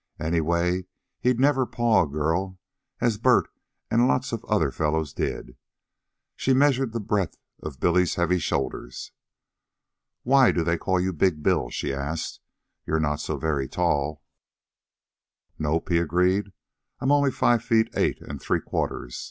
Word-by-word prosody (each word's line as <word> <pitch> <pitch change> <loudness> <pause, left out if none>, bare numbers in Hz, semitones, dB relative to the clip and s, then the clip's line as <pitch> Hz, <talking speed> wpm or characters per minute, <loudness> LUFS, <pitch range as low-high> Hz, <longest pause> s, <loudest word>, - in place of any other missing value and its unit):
Anyway, 85 +3 0 0.3
he'd 125 0 +1
never 135 -1 +3
paw 120 -2 +2
a - - -7
girl 80 +6 -1 0.4
as 115 -4 +1
Bert 125 +1 +4 0.4
and 120 +2 +4
lots 70 - 0
of - - -3
the - - -20
other - - +1
fellows 80 -2 -1
did. - - -4 0.8
She 130 - +1
measured 135 -3 +3
the 115 - -3
breadth 100 -6 -1 0.2
of 70 -3 -7
Billy's 90 +1 +2
heavy 90 +1 +1
shoulders. 65 -4 -3 1.1
"Why 130 0 +5
do 85 - 0
they 85 0 0
call 95 -1 0
you 95 +1 -1
'Big' 80 -2 +1
Bill?" - - +1
she 70 - -3
asked. 70 +4 -4 0.4
"You're 80 - 0
not 75 -1 0
so - - -3
very 70 -4 -1
tall." 75 -2 -1 1.4
"Nope," 80 +4 -1
he 85 -1 +3
agreed. 90 +4 +1 0.5
"I'm 135 - +1
only 145 -1 +4
five 120 -2 +2
feet 115 -1 +3
eight - - +1
an' 70 -1 -6
three - - 0
quarters. - - -4
90 Hz, 150 wpm, -25 LUFS, 75-115 Hz, 1.4 s, Why